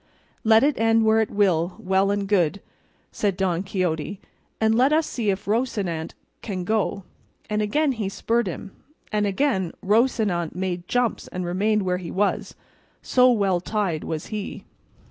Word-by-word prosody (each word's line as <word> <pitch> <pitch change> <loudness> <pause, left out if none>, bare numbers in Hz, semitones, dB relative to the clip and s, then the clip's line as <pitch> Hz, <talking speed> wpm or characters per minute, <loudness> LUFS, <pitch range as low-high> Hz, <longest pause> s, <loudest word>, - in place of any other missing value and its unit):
"Let 220 +1 +5
it 290 -3 +2
end 225 0 +3
where 220 0 +4
it 220 - -1
will, 180 -4 +1
well 190 +1 +1
and 200 -1 -1
good," 195 -2 +2 0.5
said 200 -3 -1
Don 185 -3 0
Quixote, 185 -1 -2 0.4
"and 220 0 +3
let 255 +5 +4
us 315 +1 +3
see 225 -4 -2
if 195 0 -1
Rocinante 205 -8 -1 0.3
can 190 -4 -4
go;" 200 0 -1 0.5
and 210 0 +1
again 290 +8 +1
he 220 -6 -3
spurred 230 +2 0
him, 185 +2 -6 0.4
and 210 -1 +1
again 195 - 0
Rocinante 210 -6 +1
made 180 -1 -3
jumps 245 -2 0
and 180 0 -4
remained 205 +4 +1
where 180 -1 0
he 175 -3 -7
was, 200 +2 -1 0.5
so 250 0 +5
well 195 -6 +2
tied 190 -5 -1
was 160 -1 -4
he. 210 -2 -5
200 Hz, 160 wpm, -24 LUFS, 185-225 Hz, 0.5 s, Let